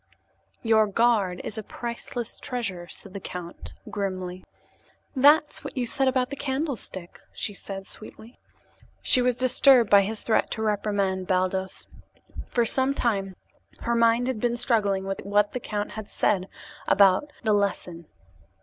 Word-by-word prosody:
"Your 220 -2 +4
guard 205 -4 +2
is 220 - -4
a - - -3
priceless 235 +1 -6
treasure," 195 -9 -4
said 195 +1 -10
the 200 - -5
count 180 -2 -8 0.2
grimly. 185 -2 -4 0.7
"That's 295 +3 +4
what - - -8
you 250 - 0
said 270 +3 +1
about 255 0 +1
the - - -3
candlestick," 265 - -4 0.2
said - - -23
she 205 - -1 0.4
sweetly. 220 +2 -10 0.6
She 255 - +4
was 250 0 +2
disturbed 255 -2 +5
by 200 -1 +8
his 210 +2 -2
threat 220 - +1
to 220 - -4
reprimand 200 -3 -1
Baldos. 185 0 -1 0.6
For 240 -1 +1
some 265 +4 +1
time 195 -7 -1 0.5
her 235 - -1
mind 230 +1 +3
had 255 -3 -2
been 240 +1 0
struggling 205 -5 +1
with 195 0 -4
what 205 +1 +2
the 250 - -2
count 210 -3 -4
had 215 -2 -7
said 190 -3 0 0.4
about 200 +9 +4
"the 215 -2 +2
lesson." 180 -5 -2
215 Hz, 150 wpm, -26 LUFS, 195-245 Hz, 0.7 s, by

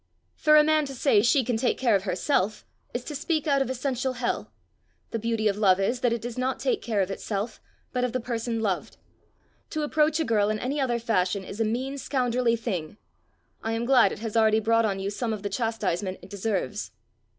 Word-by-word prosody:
For 305 0 +5
a 300 - +8
man 310 0 +3
to 270 -1 -7
say 240 -5 +4
'she 250 +4 +4
can 240 -1 0
take 245 +2 +1
care 235 -5 +3
of 195 0 0
herself,' 200 +2 0 0.3
is 245 - -4
to 300 - -6
speak 310 +1 -1
out 280 -3 +3
of 270 - 0
essential 260 0 -1
hell. 245 -1 -2 0.6
The 230 - -2
beauty 225 -1 0
of 205 0 0
love 190 -3 +4
is, 235 +6 0
that 245 -1 +2
it 235 -1 -2
does 240 +1 -5
not 260 +1 0
take - - 0
care 215 -4 0
of 190 0 -1
itself, 210 +3 -4 0.3
but 250 -1 0
of 250 - 0
the 255 - -1
person 230 -1 -2
loved. 195 -5 -2 0.7
To 310 -1 -2
approach 305 +1 +2
a 320 - +1
girl 210 -4 +2
in 215 - 0
any 275 +6 -2
other 245 -3 +1
fashion 200 -4 0
is 200 +3 -8
a - - +3
mean 260 +5 -2
scoundrelly 250 -3 +1
thing. 200 -7 -4 0.6
I 225 - -2
am 230 +1 -1
glad 250 -6 +5
it - - -5
has 220 +1 -5
already 220 -1 +4
brought 230 +1 +3
on 195 -2 -1
you 195 +1 -2
some 225 +2 -2
of 210 -2 -6
the 205 - -2
chastisement 200 -4 -1
it 185 - -13
deserves." 200 - -2
230 Hz, 220 wpm, -26 LUFS, 205-260 Hz, 0.7 s, a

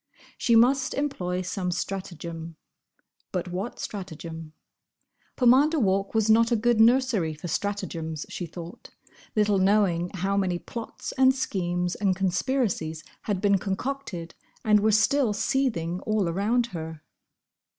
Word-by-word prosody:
She 235 - +2
must 255 +3 +4
employ 185 -11 -2
some 185 0 -3
stratagem. 170 -3 -5 0.8
But 180 0 -3
what 190 +7 -4
stratagem? 165 -5 -7 0.8
Pomander 270 +6 +5
Walk 195 -2 +1
was 220 -1 +3
not 230 +2 +5
a - - +4
good 235 +1 +2
nursery 230 -9 +3
for 155 +4 -7
stratagems, 165 -4 -3
she 175 - -5
thought, 170 +1 -10 0.5
little 210 -2 +3
knowing 190 -3 +2
how 190 +2 0
many 185 -3 +1
plots 230 +5 -7
and 260 0 +6
schemes 175 -7 -1
and 195 -2 +1
conspiracies 185 - -1 0.3
had 195 -3 0
been 200 -2 +3
concocted 195 -4 -4 0.3
and 210 -1 +5
were 215 +1 +3
still 225 +2 +3
seething 205 -7 0
all 215 -3 0
around 210 +8 +1
her. 160 -2 -6
195 Hz, 130 wpm, -26 LUFS, 175-230 Hz, 0.8 s, and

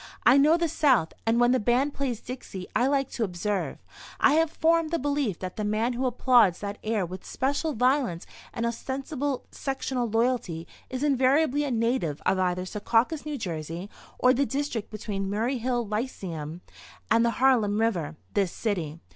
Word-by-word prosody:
I 250 - +7
know 300 +4 +5
the 340 -1 +1
South, 260 - +2
and 230 +1 +3
when 240 0 +5
the 255 - +3
band 250 +6 +1
plays 255 -5 -3
'Dixie' 230 -7 -7
I 245 - +3
like 275 -1 +1
to 235 - -2
observe. 200 +1 -2 0.4
I 280 - +5
have 325 +1 +3
formed 330 0 +2
the 335 - 0
belief 280 - -1
that 185 -1 -6
the 215 - -2
man 215 +4 0
who 255 +2 0
applauds 245 -8 +4
that 205 0 -6
air 215 -3 0
with 185 +2 -8
special 285 +4 -1
violence 250 - +1 0.3
and 230 - -3
ostensible 270 +3 -3
sectional 265 -3 -2
loyalty 225 -8 0 0.2
is 260 +2 -3
invariably 285 +1 +3
a - - -2
native 230 - 0
of 190 - +2
either 180 0 0
Secaucus, 230 - 0
N.J., 175 - -4 0.3
or 250 0 +5
the 275 - +2
district 270 -6 -3
between 200 -2 -4
Murray 230 +6 -1
Hill 240 0 -1
Lyceum 180 - -4 0.5
and 230 +1 +5
the 235 0 0
Harlem 230 -6 +3
River, 175 -9 0 0.2
this 195 -4 +1
city. 170 -8 -3
235 Hz, 170 wpm, -27 LUFS, 200-270 Hz, 0.5 s, I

